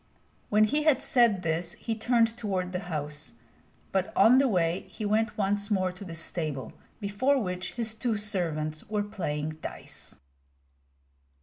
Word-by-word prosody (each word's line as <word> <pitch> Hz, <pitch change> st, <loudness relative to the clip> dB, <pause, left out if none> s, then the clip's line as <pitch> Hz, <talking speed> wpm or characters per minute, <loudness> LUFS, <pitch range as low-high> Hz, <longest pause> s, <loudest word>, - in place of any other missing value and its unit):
When 210 Hz, +1 st, +5 dB
he 295 Hz, +8 st, +2 dB
had 300 Hz, -4 st, +3 dB
said 230 Hz, -7 st, +4 dB
this 165 Hz, +1 st, -1 dB
he 230 Hz, -, -3 dB
turned 230 Hz, 0 st, +2 dB
toward 190 Hz, -6 st, -2 dB
the 180 Hz, -, -2 dB
house; 150 Hz, -1 st, -4 dB, 0.6 s
but 190 Hz, -1 st, 0 dB
on 250 Hz, +4 st, +7 dB
the 275 Hz, -, +4 dB
way 175 Hz, -4 st, +1 dB
he 215 Hz, -, -5 dB
went 215 Hz, +2 st, +1 dB
once 205 Hz, 0 st, +1 dB
more 185 Hz, -3 st, +1 dB
to 180 Hz, +2 st, -10 dB
the 170 Hz, -4 st, -7 dB
stable, 155 Hz, -7 st, -3 dB, 0.3 s
before 220 Hz, +7 st, +2 dB
which 180 Hz, -4 st, -3 dB
his 225 Hz, -2 st, -2 dB
two 220 Hz, -1 st, -1 dB
servants 160 Hz, -7 st, -1 dB
were 210 Hz, -1 st, 0 dB
playing 155 Hz, -7 st, -3 dB
dice. -, -, -7 dB
200 Hz, 150 wpm, -28 LUFS, 170-220 Hz, 0.6 s, on